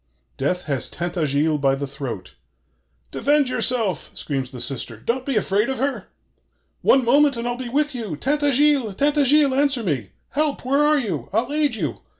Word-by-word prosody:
Death 180 +7 -1
has 140 -4 -2
Tintagiles 155 -3 -1
by 135 -1 +3
the 140 +1 -4
throat. 135 -9 -7 0.8
'Defend 290 -2 +2
yourself!' 235 -7 0
screams 135 -3 -3
the 130 - -9
sister: 120 -3 -4
'don't 250 - -3
be 275 - 0
afraid 210 +2 +1
of 265 - -2
her! 275 +2 -2 0.7
One 265 -2 +4
moment 280 +2 +4
and 235 +1 -3
I'll 240 - -1
be 245 -1 -6
with 295 +3 0
you! 220 -10 -4
Tintagiles? 285 - +2
Tintagiles? 290 0 +3
Answer 280 -3 +2
me! 135 - -2 0.2
Help! 295 -2 -1
Where 275 +3 +2
are 300 0 +4
you? 180 - -3
I'll 230 +8 0
aid 295 -5 +1
you! 155 - -3
235 Hz, 165 wpm, -22 LUFS, -, 0.8 s, One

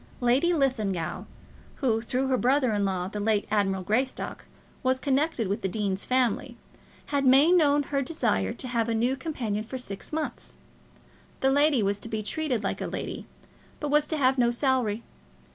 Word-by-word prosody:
Lady 255 +8 +3
Linlithgow, 215 - -1 0.5
who, 230 -5 0
through 255 +3 -1
her 265 -1 +2
brother 255 -1 +2
in 205 -1 +1
law, 185 -2 -1
the 210 +2 -5
late 210 0 +1
Admiral 195 -3 +1
Greystock, 250 +7 -2 0.4
was 260 0 +1
connected 275 -4 0
with 200 +4 -2
the - - 0
dean's 195 -1 -2
family, 255 -3 0 0.6
had 280 -1 +2
made 270 +5 +6
known 295 -5 +4
her 275 0 -1
desire 100 - 0
to 255 - -6
have 235 -2 0
a 230 - 0
new 240 +4 +1
companion 245 -8 -3
for 250 +4 -6
six 200 -6 -6
months. 315 0 -4 0.9
The 265 - +3
lady 285 -4 +4
was 200 +1 0
to 230 - -7
be 220 -1 -3
treated 260 -2 -2
like - - -2
a - - -2
lady, - - -5 0.5
but 295 - -3
was 300 0 +3
to 315 - -1
have 260 -2 +2
no 240 -1 +4
salary. 240 -3 0
250 Hz, 180 wpm, -27 LUFS, 210-275 Hz, 0.9 s, made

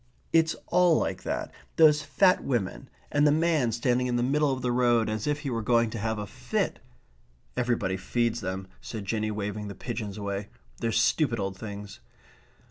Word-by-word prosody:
It's 165 0 +4
all 180 -3 +4
like - - -1
that. - - -3 0.2
Those 150 -2 +6
fat 155 +6 +3
women 95 - -2 0.2
and 145 0 +4
the - - +5
man 155 -5 +2
standing 125 +2 +1
in 120 - 0
the 120 - +1
middle 145 +3 +2
of 130 -1 -3
the 125 - +1
road 120 -2 +3
as 110 +3 -3
if 150 0 0
he 140 - -3
were 115 -1 -1
going 115 0 +2
to 115 - -4
have 110 +1 -1
a 105 - -3
fit - - -2 0.4
..." - - -36
"Everybody 120 -7 0
feeds 120 +4 -1
them," 95 0 -4 0.2
said 110 -3 -6
Jinny, 110 +1 -1
waving 105 0 -3
the 100 - -7
pigeons 110 -3 -5
away. 100 0 -3 0.3
"They're 115 - 0
stupid 115 +2 +2
old 95 -1 -2
things." 105 0 -8
115 Hz, 190 wpm, -28 LUFS, 105-135 Hz, 0.4 s, Those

